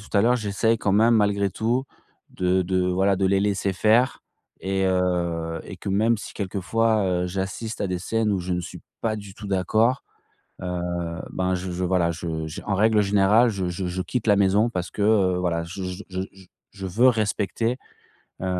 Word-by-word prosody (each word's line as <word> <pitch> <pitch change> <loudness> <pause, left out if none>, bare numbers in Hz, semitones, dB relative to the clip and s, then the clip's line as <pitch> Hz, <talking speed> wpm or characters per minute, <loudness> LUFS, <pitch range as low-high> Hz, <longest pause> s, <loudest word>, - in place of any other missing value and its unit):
tout 105 - -15
à - - +6
l'heure, 120 +3 +4
j'essaye 110 +1 0
quand 100 - 0
même, 115 +4 +5
malgré 100 -2 +2
tout 115 +7 0 0.5
de 90 0 +1
de, 90 0 0
voilà, 95 +2 +2
de 95 0 +1
les 95 0 +2
laisser 100 -1 0
faire, 115 +6 +2 0.4
et 95 0 -1
heu, 85 -3 0
et - - -9
que 95 - -7
même 110 +4 +2
si 105 - -8
quelquefois, 105 +3 0 0.2
heu, - - -2
j'assiste 95 +5 -4
à 100 - 0
des 90 -1 -2
scènes 110 +3 0
où 100 - 0
je 90 +1 -3
ne 90 - 0
suis 85 - -9 0.2
pas 110 -1 -1
du 100 -2 -9
tout 105 - -9
d'accord, 110 +6 +1 0.6
heu, 90 -1 -3 0.5
ben, 95 0 0
je 90 0 -4
je, 90 +1 -3
voilà, 90 -2 +2
je 80 -1 -4
j 80 - -7
en 100 - 0
règle 110 +1 +4
générale 105 +4 +4
je 95 -4 -2
je 90 +1 -3
je 90 +1 -3
quitte 100 +6 -3
la 105 - +6
maison 100 +3 +3
parce 90 -6 -4
que, - - -5
heu, 100 -4 +3
voilà, 85 -2 -1
je 90 +3 -7
je 90 +2 -5
je 95 0 -3
je 95 -1 -17 0.3
je 95 -1 -8
veux 110 +8 +3
respecter, 115 +1 0 0.7
heu, - - -1
95 Hz, 205 wpm, -24 LUFS, 90-110 Hz, 0.7 s, à